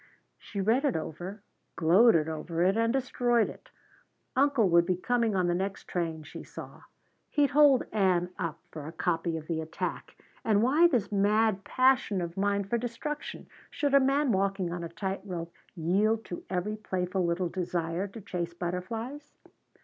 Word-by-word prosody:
She 200 - -7
read 225 +8 +2
it 285 -5 +1
over, 180 +6 -5 0.3
gloated 170 -1 +5
over 165 +2 -2
it, 190 +2 +3
and 230 0 +2
destroyed 245 -3 +1
it. - - -12 0.7
"Uncle 270 -5 +3
would 170 0 +5
be 185 - +2
coming 230 +1 +1
on 185 -1 +2
the 175 - +1
next 190 +2 -3
train," 165 -3 -2
she 150 - -9
saw. - - -10 0.5
"He'd 290 -2 +2
hold 285 -2 +6
Ann 185 -4 +2
up 165 -3 -2
for 155 -2 -7
a - - -6
copy 165 -1 -1
of 155 - -8
the 160 -1 -2
attack! 160 0 -5 0.3
And 215 -1 +3
why 300 +8 +5
this 245 - 0
mad 205 0 +2
passion 255 -4 +2
of 170 -1 -4
mine 200 +1 +1
for 230 +5 -1
destruction? 250 +6 -5 0.2
Should 285 -2 -1
a 280 - +8
man 275 0 +2
walking 195 -3 0
on 175 -1 -4
a 170 - -5
tight 190 +3 -4
rope 170 -4 -6 0.2
yield 205 +7 +1
to 175 - -7
every 190 +4 -2
playful 185 -2 -2
little 170 +1 0
desire 175 0 -2
to 215 +3 -10
chase 175 -3 -4
butterflies?" 225 +12 -5
195 Hz, 170 wpm, -29 LUFS, 175-230 Hz, 0.7 s, a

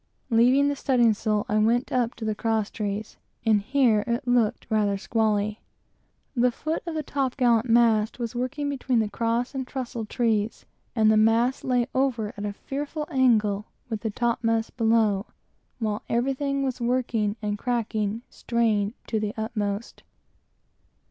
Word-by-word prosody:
Leaving 250 +5 +5
the 285 - 0
studding 245 -5 +3
sail, 210 0 -1
I 215 +1 +1
went 235 +3 +2
up 245 -2 0
to 225 - -6
the 215 - 0
cross 220 -1 -1
trees; 210 0 -4 0.3
and 215 -2 +4
here 235 -2 +3
it 235 +1 -2
looked 240 -3 +2
rather 210 -2 +1
squally. 215 0 0 0.7
The 245 0 +3
foot 310 +6 -3
of 330 - -3
the 310 - -2
top 270 -3 -2
gallant 240 -2 +3
mast 225 -2 +3
was 235 -2 -4
working 255 +4 -2
between 265 -3 0
the 220 -2 +1
cross 235 +3 -1
and 260 -2 -4
trussel 245 -4 -4
trees, 220 -2 0 0.3
and 220 -2 +4
the 215 - +4
royal 215 - +5
mast 235 +3 +2
lay 250 -2 +2
over 255 -5 0
at 205 0 -5
a 205 - -4
fearful 290 +6 -5
angle 220 -6 +2 0.2
with 220 -3 -3
the 235 +2 0
mast 225 -1 0
below, 220 -4 +2 0.5
while 215 -3 -2
everything 275 +3 0
was 260 -2 -2
working, 235 -4 0
and 210 -1 -3
cracking, 225 -2 -1
strained 220 -2 0
to 220 - -1
the 210 0 -3
utmost. 215 -1 -3
230 Hz, 160 wpm, -25 LUFS, 215-250 Hz, 0.7 s, Leaving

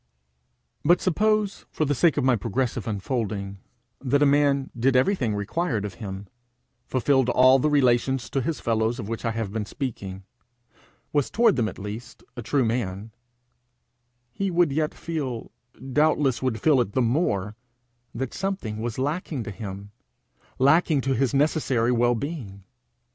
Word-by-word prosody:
But 175 +4 +5
suppose, 210 +2 0
for 155 - -1
the 145 - +1
sake 160 +2 +3
of 145 - +1
my 130 -1 +4
progressive 120 +1 -2
unfolding, 100 -2 -3 0.4
that 140 +2 +2
a - - +6
man 140 -1 +2
did 130 +3 +2
everything 130 - +2
required 105 - -1
of 100 - -5
him 100 -1 -6 0.6
fulfilled 130 0 +2
all 130 +2 +6
the 150 - +2
relations 130 -3 +2
to 135 - 0
his 150 +2 -2
fellows 115 +1 0
of 110 -6 -6
which 115 +1 -5
I - - +2
have 110 -3 -3
been 110 -2 -3
speaking, 100 -9 -5 0.9
was 145 -3 +1
toward 230 -3 +3
them 115 -4 +1
at - - -11
least, 110 +4 -8
a 120 - -5
true 130 +3 +1
man; 110 -2 -2 1.2
he 195 +10 -2
would 175 -4 +2
yet 155 +2 -1
feel, 140 -8 -4 0.4
doubtless 150 -3 +2
would 125 -4 -1
feel 145 -5 +4
it 100 -4 -3
the 130 - +2
more, 110 - 0 0.6
that 130 +1 -3
something 190 - -3
was 115 -1 -3
lacking 145 -1 -2
to 105 - -6
him 100 -1 -8 0.7
lacking 145 +2 +4
to 135 +1 0
his 130 0 +1
necessary 135 -5 +1
well 120 0 +3
being. 115 - -6
125 Hz, 155 wpm, -25 LUFS, 110-145 Hz, 1.2 s, a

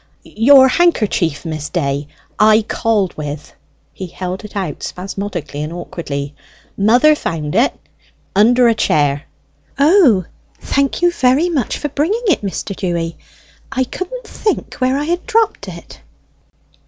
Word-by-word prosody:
"Your 265 +4 +5
handkerchief: 215 - +1
Miss 155 -2 -4
Day: 140 -4 -2 0.3
I 215 +1 +5
called 210 -4 0
with." 150 0 -6 0.4
He 190 - -7
held 185 +2 -6
it 210 - -11
out 185 -8 -4
spasmodically 180 -6 -5
and 150 +1 -4
awkwardly. 145 -5 -5 0.4
"Mother 245 +9 +5
found 160 - -3
it: 235 +7 +3 0.6
under 240 +4 +5
a 230 - +4
chair." 145 -8 +1 0.5
"O, 280 - +4 0.3
thank 280 +4 -1
you 350 - +5
very 275 +3 +2
much 280 -9 -1
for 295 - -3
bringing 340 - -1
it, 365 -8 +2
Mr. 200 0 -4
Dewy. 170 -3 -2 0.6
I 260 -1 +1
couldn't 370 - -6
think 425 - -2
where 255 +1 +1
I 290 - -1
had 345 +3 -2
dropped 440 - +1
it." 170 -2 -11
210 Hz, 135 wpm, -17 LUFS, 170-280 Hz, 0.6 s, Your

